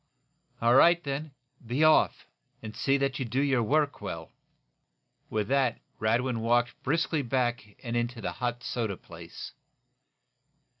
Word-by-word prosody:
"All 120 Hz, +1 st, +5 dB
right, 170 Hz, +6 st, +6 dB
then! 145 Hz, +2 st, -3 dB, 0.3 s
Be 125 Hz, +6 st, 0 dB
off, 155 Hz, 0 st, +4 dB, 0.4 s
and 110 Hz, 0 st, -7 dB
see 135 Hz, 0 st, +2 dB
that 140 Hz, 0 st, -1 dB
you 130 Hz, -, -1 dB
do 125 Hz, +3 st, -1 dB
your 135 Hz, -3 st, +2 dB
work 145 Hz, +5 st, +1 dB
well!" -, -, -6 dB, 1.0 s
With 105 Hz, -2 st, -1 dB
that 135 Hz, -4 st, +2 dB, 0.2 s
Radwin 115 Hz, +2 st, +1 dB
walked 120 Hz, +1 st, +1 dB
briskly 160 Hz, +1 st, 0 dB
back 120 Hz, -4 st, -1 dB
and 120 Hz, -1 st, -3 dB
into 120 Hz, 0 st, -1 dB
the 110 Hz, -, -3 dB
hot 120 Hz, -1 st, -3 dB
soda 110 Hz, -6 st, -2 dB
place. 85 Hz, 0 st, -10 dB
125 Hz, 140 wpm, -28 LUFS, 115-140 Hz, 1.0 s, right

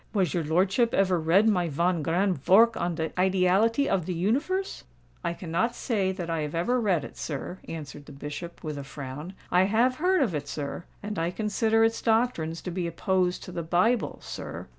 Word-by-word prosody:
Was 190 Hz, -7 st, +1 dB
your 170 Hz, -, 0 dB
lordship 190 Hz, +9 st, +2 dB
ever 185 Hz, -3 st, +3 dB
read 175 Hz, +7 st, +4 dB
my 180 Hz, -6 st, +2 dB
von 170 Hz, +3 st, +1 dB
grand 175 Hz, -1 st, 0 dB
vork 225 Hz, +4 st, +6 dB
on 175 Hz, 0 st, -1 dB
de 160 Hz, 0 st, -2 dB
'Ideality 190 Hz, +8 st, +3 dB
of 180 Hz, -4 st, 0 dB
de 180 Hz, -, -2 dB
Universe?'" 285 Hz, -, -1 dB, 0.4 s
"I 170 Hz, -, -1 dB
cannot 185 Hz, +8 st, -1 dB
say 200 Hz, -6 st, 0 dB
that 180 Hz, -3 st, -5 dB
I 165 Hz, -2 st, -1 dB
have 150 Hz, +1 st, -4 dB
ever 240 Hz, +9 st, +1 dB
read 185 Hz, -9 st, +1 dB
it, -, -, -9 dB
sir," 160 Hz, +5 st, -5 dB
answered 145 Hz, -3 st, -7 dB
the -, -, -10 dB
Bishop, 145 Hz, +5 st, -7 dB
with 150 Hz, -3 st, -4 dB
a -, -, -5 dB
frown. 145 Hz, +6 st, -7 dB, 0.2 s
"I 180 Hz, +1 st, +5 dB
have 235 Hz, +6 st, +2 dB
heard 365 Hz, 0 st, +3 dB
of 215 Hz, -9 st, -1 dB
it, 145 Hz, -1 st, -3 dB
sir—and 170 Hz, +8 st, -6 dB
I 165 Hz, +1 st, 0 dB
consider 220 Hz, +3 st, +1 dB
its 225 Hz, 0 st, +1 dB
doctrines 220 Hz, -9 st, 0 dB
to 180 Hz, -, -4 dB
be 175 Hz, 0 st, -2 dB
opposed 180 Hz, +1 st, 0 dB
to -, -, -8 dB
the 175 Hz, -1 st, -3 dB
Bible, 180 Hz, +9 st, +1 dB
sir. -, -, -7 dB
180 Hz, 195 wpm, -27 LUFS, 165-220 Hz, 0.4 s, vork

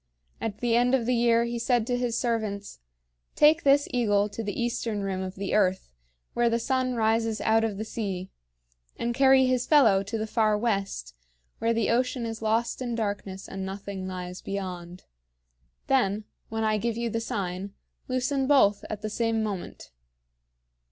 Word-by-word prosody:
At 220 Hz, -1 st, -4 dB
the 240 Hz, -1 st, +2 dB
end 245 Hz, +2 st, +4 dB
of 245 Hz, -3 st, -1 dB
the 250 Hz, -, +1 dB
year 235 Hz, -1 st, +3 dB
he 235 Hz, 0 st, -3 dB
said 235 Hz, -1 st, +1 dB
to 245 Hz, -, 0 dB
his 245 Hz, -1 st, -1 dB
servants: 215 Hz, -4 st, -2 dB, 0.6 s
"Take 310 Hz, +2 st, +5 dB
this 285 Hz, -1 st, +4 dB
eagle 210 Hz, -4 st, +2 dB
to 225 Hz, -, -5 dB
the 205 Hz, +2 st, -4 dB
eastern 235 Hz, -3 st, -2 dB
rim 190 Hz, -1 st, -2 dB
of 185 Hz, 0 st, -5 dB
the 195 Hz, 0 st, -3 dB
earth, 190 Hz, -, +1 dB, 0.4 s
where 240 Hz, 0 st, +2 dB
the 230 Hz, -, +1 dB
sun 255 Hz, +1 st, 0 dB
rises 225 Hz, 0 st, +1 dB
out 225 Hz, 0 st, +3 dB
of 215 Hz, -3 st, -1 dB
the 215 Hz, -, -4 dB
sea; 195 Hz, -5 st, -4 dB, 0.7 s
and 235 Hz, 0 st, -1 dB
carry 265 Hz, +1 st, +5 dB
his 255 Hz, -1 st, +1 dB
fellow 230 Hz, -11 st, +5 dB
to 200 Hz, +3 st, -4 dB
the 220 Hz, -, -2 dB
far 215 Hz, -1 st, +2 dB
west, 195 Hz, -, -2 dB, 0.5 s
where 230 Hz, -, +1 dB
the 230 Hz, -1 st, +1 dB
ocean 250 Hz, 0 st, 0 dB
is 225 Hz, -1 st, -5 dB
lost 225 Hz, +3 st, 0 dB
in 240 Hz, -2 st, -2 dB
darkness 200 Hz, -3 st, -4 dB
and 195 Hz, 0 st, -6 dB
nothing 195 Hz, 0 st, -5 dB
lies 180 Hz, 0 st, -6 dB
beyond. 180 Hz, -2 st, -6 dB, 0.8 s
Then, 215 Hz, -6 st, +1 dB, 0.3 s
when 225 Hz, 0 st, -2 dB
I 215 Hz, -1 st, +1 dB
give 230 Hz, +1 st, -2 dB
you 235 Hz, -1 st, -2 dB
the 230 Hz, -, -1 dB
sign, 195 Hz, -4 st, -4 dB, 0.3 s
loosen 260 Hz, +1 st, 0 dB
both 210 Hz, -8 st, +4 dB
at 215 Hz, 0 st, -5 dB
the 215 Hz, -, -2 dB
same 225 Hz, 0 st, 0 dB
moment." 200 Hz, -4 st, -6 dB
225 Hz, 175 wpm, -27 LUFS, 200-240 Hz, 0.8 s, Take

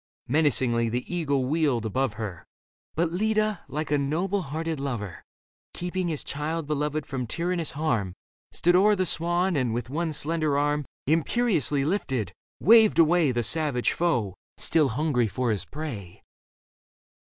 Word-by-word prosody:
Menacingly 125 Hz, -5 st, +2 dB
the 125 Hz, +8 st, -4 dB
eagle 140 Hz, -6 st, 0 dB
wheeled 140 Hz, -5 st, +1 dB
above 130 Hz, +1 st, 0 dB
her; 105 Hz, -6 st, -6 dB, 0.5 s
But 165 Hz, +1 st, +1 dB
Leda, 215 Hz, +3 st, 0 dB
like 150 Hz, +1 st, -4 dB
a 145 Hz, -, +3 dB
noble 175 Hz, +8 st, 0 dB
hearted 160 Hz, 0 st, -4 dB
lover 115 Hz, -10 st, -4 dB, 0.5 s
Keeping 180 Hz, +1 st, -2 dB
his 155 Hz, -4 st, -3 dB
child 155 Hz, +2 st, -3 dB
beloved 150 Hz, 0 st, -2 dB
from 130 Hz, -4 st, -4 dB
tyrannous 170 Hz, +4 st, -2 dB
harm. 120 Hz, -, -1 dB, 0.4 s
Stood 175 Hz, +1 st, +2 dB
o'er 205 Hz, +3 st, +5 dB
the 185 Hz, -1 st, 0 dB
swan 175 Hz, +2 st, +1 dB
and, 125 Hz, -5 st, 0 dB
with 120 Hz, +1 st, -4 dB
one 165 Hz, +2 st, -1 dB
slender 155 Hz, -1 st, 0 dB
arm 145 Hz, 0 st, 0 dB, 0.2 s
Imperiously 160 Hz, -, +1 dB
lifted, 130 Hz, -, -1 dB, 0.3 s
waved 220 Hz, 0 st, +6 dB
away 165 Hz, -3 st, +4 dB
The 120 Hz, -1 st, -1 dB
savage 145 Hz, -2 st, +1 dB
foe, 120 Hz, -, 0 dB, 0.2 s
still 155 Hz, -3 st, +2 dB
hungry 140 Hz, -7 st, +1 dB
for 125 Hz, +2 st, -1 dB
his 105 Hz, -, -2 dB
prey. 125 Hz, -, -7 dB
150 Hz, 145 wpm, -26 LUFS, 125-170 Hz, 0.5 s, waved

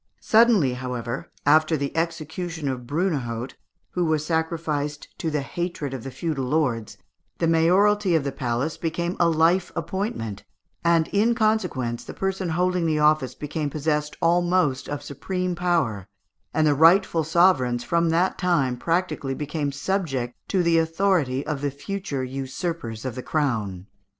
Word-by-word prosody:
Suddenly, 220 Hz, -, +4 dB
however, 125 Hz, -1 st, -4 dB, 0.2 s
after 155 Hz, +2 st, +4 dB
the 140 Hz, -1 st, -3 dB
execution 165 Hz, -1 st, -3 dB
of 125 Hz, -2 st, -3 dB
Brunehaut, 135 Hz, -7 st, -2 dB, 0.4 s
who 180 Hz, -, 0 dB
was 155 Hz, -2 st, +1 dB
sacrificed 160 Hz, -3 st, -2 dB
to 165 Hz, -, -1 dB
the 150 Hz, -2 st, -1 dB
hatred 170 Hz, -3 st, -4 dB
of 130 Hz, -4 st, -5 dB
the 135 Hz, -, -5 dB
feudal 135 Hz, 0 st, -3 dB
lords, 125 Hz, -6 st, -1 dB, 0.4 s
the -, -, 0 dB
mayoralty 185 Hz, +4 st, +3 dB
of 160 Hz, -, +2 dB
the 140 Hz, -, -2 dB
palace 130 Hz, +3 st, -2 dB
became 170 Hz, +2 st, -2 dB
a 170 Hz, -, +4 dB
life 165 Hz, +3 st, +3 dB
appointment, 165 Hz, -, -3 dB, 0.4 s
and, 170 Hz, -1 st, +3 dB
in 220 Hz, +4 st, +2 dB
consequence, 180 Hz, -, 0 dB
the -, -, -9 dB
person 190 Hz, -2 st, -2 dB
holding 180 Hz, +1 st, +1 dB
the 155 Hz, -1 st, +1 dB
office 150 Hz, -4 st, +2 dB
became 150 Hz, 0 st, -3 dB
possessed 150 Hz, 0 st, -1 dB
almost 175 Hz, -4 st, +2 dB
of 145 Hz, 0 st, -4 dB
supreme 180 Hz, +6 st, -3 dB
power, 165 Hz, -, 0 dB, 0.4 s
and 155 Hz, +1 st, +2 dB
the 150 Hz, -, +4 dB
rightful 165 Hz, +2 st, +5 dB
sovereigns 155 Hz, -7 st, +3 dB
from 170 Hz, +2 st, +1 dB
that 175 Hz, +3 st, +1 dB
time 140 Hz, -9 st, +1 dB
practically 165 Hz, -3 st, -1 dB
became 150 Hz, 0 st, -2 dB
subject 140 Hz, -6 st, -2 dB
to 185 Hz, -3 st, +1 dB
the 170 Hz, -1 st, +4 dB
authority 160 Hz, -5 st, +1 dB
of 150 Hz, -3 st, -3 dB
the 145 Hz, -, 0 dB
future 140 Hz, -1 st, -4 dB
usurpers 135 Hz, -, -4 dB
of 130 Hz, -, -2 dB
the 125 Hz, -, -5 dB
crown. 110 Hz, -, -1 dB
155 Hz, 150 wpm, -24 LUFS, 135-175 Hz, 0.4 s, rightful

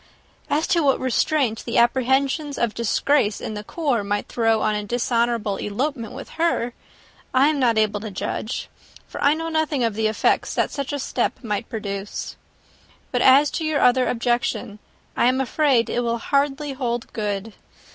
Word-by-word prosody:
As 305 Hz, +3 st, +1 dB
to 340 Hz, -, +2 dB
what 275 Hz, -3 st, +3 dB
restraint 260 Hz, -2 st, +1 dB
the 235 Hz, -, -2 dB
apprehensions 265 Hz, +4 st, +2 dB
of 235 Hz, -2 st, 0 dB
disgrace 235 Hz, 0 st, +1 dB
in -, -, -5 dB
the 210 Hz, 0 st, -6 dB
corps 275 Hz, -4 st, -1 dB
might 205 Hz, +1 st, -2 dB
throw 225 Hz, -2 st, +1 dB
on 215 Hz, -, +2 dB
a 210 Hz, 0 st, -2 dB
dishonourable 235 Hz, -2 st, 0 dB
elopement 235 Hz, +2 st, -3 dB
with -, -, -8 dB
her, 245 Hz, -8 st, +1 dB, 0.6 s
I 270 Hz, +3 st, +5 dB
am 305 Hz, -2 st, 0 dB
not 235 Hz, -4 st, +3 dB
able 215 Hz, -1 st, +2 dB
to 215 Hz, +1 st, -6 dB
judge; 215 Hz, +4 st, -4 dB, 0.4 s
for -, -, -6 dB
I 285 Hz, +2 st, +5 dB
know 325 Hz, +1 st, -4 dB
nothing 315 Hz, -4 st, 0 dB
of 230 Hz, -2 st, +1 dB
the 220 Hz, +1 st, 0 dB
effects 215 Hz, -, +1 dB
that -, -, +1 dB
such 280 Hz, -1 st, -4 dB
a 290 Hz, -, -2 dB
step 270 Hz, -, -2 dB
might 210 Hz, 0 st, -3 dB
produce. 200 Hz, -3 st, -5 dB, 0.8 s
But 245 Hz, -, 0 dB
as 275 Hz, +3 st, +6 dB
to 325 Hz, -, -3 dB
your 310 Hz, -2 st, 0 dB
other 250 Hz, +1 st, +4 dB
objection, 240 Hz, -2 st, -1 dB, 0.4 s
I -, -, +3 dB
am 255 Hz, +1 st, +2 dB
afraid 265 Hz, -2 st, +2 dB
it -, -, -1 dB
will 235 Hz, -1 st, 0 dB
hardly 280 Hz, +3 st, 0 dB
hold 240 Hz, -3 st, -3 dB
good. 210 Hz, 0 st, -3 dB
240 Hz, 175 wpm, -23 LUFS, 220-280 Hz, 0.8 s, as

